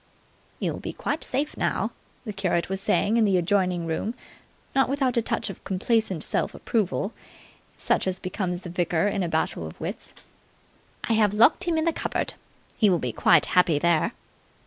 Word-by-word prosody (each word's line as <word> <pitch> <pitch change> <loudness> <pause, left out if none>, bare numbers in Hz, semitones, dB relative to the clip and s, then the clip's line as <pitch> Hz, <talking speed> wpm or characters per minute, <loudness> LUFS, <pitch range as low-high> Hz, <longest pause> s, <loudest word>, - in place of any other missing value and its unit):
"You'll - - -2
be - - -5
quite 300 - -3
safe 285 +4 -2
now," - - -1 0.3
the 215 - -4
curate 185 -3 0
was 195 0 -2
saying 210 +3 +2
in 230 - +4
the 195 -3 +3
adjoining 180 -1 +1
room, 165 +8 -2 0.6
not 270 -1 +3
without 270 -3 +1
a 235 - +3
touch - - -1
of 190 - -14
complacent 190 -3 0
self - - -1
approval 210 -1 -1 0.6
such - - +1
as 185 0 -1
becomes 180 -1 -3
the 180 - -8
victor 175 0 +1
in 200 -1 -1
a 175 - -1
battle 160 - -1
of 80 - -12
wits. - - -6 0.9
"I - - 0
have 210 -2 +3
locked 235 +11 +5
him 340 -2 +1
in 315 - +1
the 335 - +2
cupboard. - - -2 0.5
He 215 - +5
will 180 - +3
be 125 -6 -2
quite - - +4
happy 180 -4 +3
there." 170 +1 +2
195 Hz, 180 wpm, -25 LUFS, 175-230 Hz, 0.9 s, locked